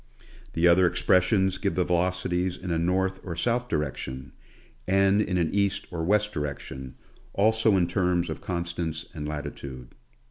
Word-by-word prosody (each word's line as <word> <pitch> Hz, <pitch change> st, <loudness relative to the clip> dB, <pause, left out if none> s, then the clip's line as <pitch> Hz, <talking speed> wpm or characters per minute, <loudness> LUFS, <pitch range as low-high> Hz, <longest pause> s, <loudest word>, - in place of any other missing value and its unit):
The 85 Hz, +1 st, +3 dB
other 90 Hz, +1 st, +6 dB
expressions 95 Hz, +1 st, +2 dB
give 100 Hz, -1 st, -1 dB
the 90 Hz, -, +2 dB
veloci 90 Hz, +1 st, 0 dB
ties 90 Hz, +1 st, 0 dB
in 90 Hz, -1 st, -5 dB
a 80 Hz, -, +1 dB
north 95 Hz, +2 st, 0 dB
or 85 Hz, -3 st, -5 dB
south 120 Hz, +7 st, 0 dB
direction, 65 Hz, -, -3 dB, 0.6 s
and 95 Hz, +1 st, +4 dB
in 90 Hz, -3 st, 0 dB
an 85 Hz, -2 st, 0 dB
east 100 Hz, -1 st, +1 dB
or 85 Hz, -2 st, -3 dB
west 105 Hz, +4 st, +2 dB
direction, 65 Hz, -3 st, -5 dB, 0.4 s
also 110 Hz, 0 st, +3 dB
in 90 Hz, -, +3 dB
terms 90 Hz, 0 st, +1 dB
of 80 Hz, -, -5 dB
constants 85 Hz, -2 st, -3 dB
and 75 Hz, -3 st, -5 dB
latitude. 70 Hz, -4 st, -7 dB
90 Hz, 155 wpm, -26 LUFS, 80-95 Hz, 0.6 s, other